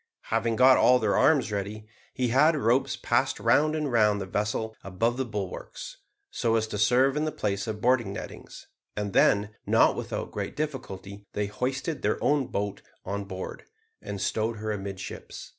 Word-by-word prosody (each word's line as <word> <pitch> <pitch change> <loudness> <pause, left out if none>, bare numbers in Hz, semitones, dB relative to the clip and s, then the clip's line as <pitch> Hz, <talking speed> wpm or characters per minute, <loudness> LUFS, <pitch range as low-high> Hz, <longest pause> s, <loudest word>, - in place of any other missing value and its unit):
Having 115 0 +1
got 130 +2 +7
all 125 - +6
their 110 -4 +1
arms 140 -8 +3
ready, 105 +1 -4 0.3
he 125 -1 -1
had 150 +7 +5
ropes 130 -2 +2
passed - - +1
round 155 +1 +3
and 150 -3 -1
round 105 -3 +3
the 95 - -3
vessel 105 +3 -2
above 115 +5 0
the 130 +1 -2
bulwarks, 110 - -6 0.3
so 115 -2 +1
as 110 -1 +2
to 105 -2 -5
serve 125 +5 +4
in 150 +1 0
the 155 - -1
place 100 -5 -2
of 105 -1 -4
boarding 120 -4 +2
nettings, 100 - -9 0.3
and 100 -2 -2
then, 100 +1 +4 0.2
not - - +4
without - - -4
great - - -4
difficulty, 100 -9 -5
they 105 - -1
hoisted 130 +8 -3
their - - +1
own 145 -3 +2
boat 100 0 -3 0.2
on 100 +1 -3
board, 95 -1 -7 0.4
and 100 - -6
stowed 110 +4 -1
her 110 +1 -3
amidships. 100 -2 -6
110 Hz, 175 wpm, -27 LUFS, 100-130 Hz, 0.4 s, got